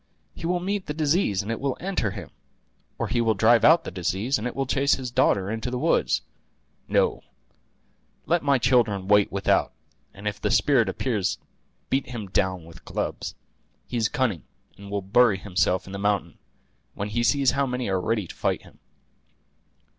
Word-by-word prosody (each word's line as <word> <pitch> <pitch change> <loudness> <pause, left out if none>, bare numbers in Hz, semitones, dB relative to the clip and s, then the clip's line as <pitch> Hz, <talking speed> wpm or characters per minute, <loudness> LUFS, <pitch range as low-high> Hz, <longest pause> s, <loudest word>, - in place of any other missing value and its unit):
He 165 - -5
will 180 0 +1
meet 195 +2 -3
the 150 - -3
disease, 150 - +1
and 105 - -4
it 115 - -3
will 135 -2 -2
enter 185 - -1
him; - - -8 0.7
or - - -2
he 120 - 0
will 110 -2 +2
drive 115 +3 +4
out 165 +2 +6
the - - -6
disease, 95 - -1
and 110 - -3
it 125 - -6
will 135 - -1
chase 140 +2 +2
his 130 -2 -6
daughter 100 -6 +2
into 115 +2 -3
the 125 - -3
woods. - - +1 0.6
No; - - +1 1.0
let 170 0 +2
my 140 -1 +3
children 110 -6 +2
wait 105 0 +4
without, 100 0 +1 0.4
and 100 +2 -8
if 105 0 -3
the - - 0
spirit 130 -6 +3
appears 110 -8 -1 0.5
beat 135 0 +1
him 115 -4 -5
down 95 -2 0
with 85 +1 -14
clubs. - - -4 0.5
He 125 - -4
is 110 -2 +1
cunning, 125 - 0 0.3
and 100 +1 -12
will 100 -1 -2
bury 110 +1 +4
himself 95 -1 0
in 95 - -10
the 100 - -4
mountain, 100 0 -1 0.6
when 100 +1 -4
he 115 +3 -1
sees 135 +2 +3
how 140 0 0
many 125 -1 -2
are 95 -2 0
ready 105 +1 0
to - - -10
fight - - -1
him." - - -18
115 Hz, 185 wpm, -25 LUFS, 100-135 Hz, 1.0 s, out